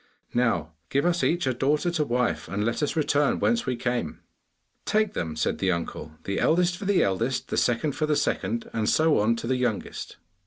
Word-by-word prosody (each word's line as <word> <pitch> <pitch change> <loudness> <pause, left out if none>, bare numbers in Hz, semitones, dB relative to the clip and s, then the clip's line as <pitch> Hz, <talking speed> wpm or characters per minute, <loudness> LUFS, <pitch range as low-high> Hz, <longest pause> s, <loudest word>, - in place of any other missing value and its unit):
Now 115 -11 +1 0.2
give 140 +3 +1
us 175 0 +1
each 175 -1 +1
a 130 - +1
daughter 150 +7 +1
to 165 -3 +1
wife, 125 -2 -1
and 100 +5 -2
let 115 +5 -1
us 150 - 0
return 145 -2 +2
whence 235 -1 +1
we 125 - 0
came.' 120 - -2 0.7
'Take 215 -1 +1
them!' 80 -2 -3
said 80 - -1
the 95 - +2
uncle; 85 -2 -4
'the 100 - -2
eldest 175 +1 +3
for 200 - -7
the 200 -1 +3
eldest, 115 +7 -1
the - - -2
second 125 +5 +1
for 155 +2 -2
the 150 - +2
second, 115 -5 -1
and 110 -1 0
so 160 -1 +3
on 110 +3 +3
to 115 - -6
the 130 +2 +1
youngest. 120 -5 -3
125 Hz, 205 wpm, -26 LUFS, 110-155 Hz, 0.7 s, eldest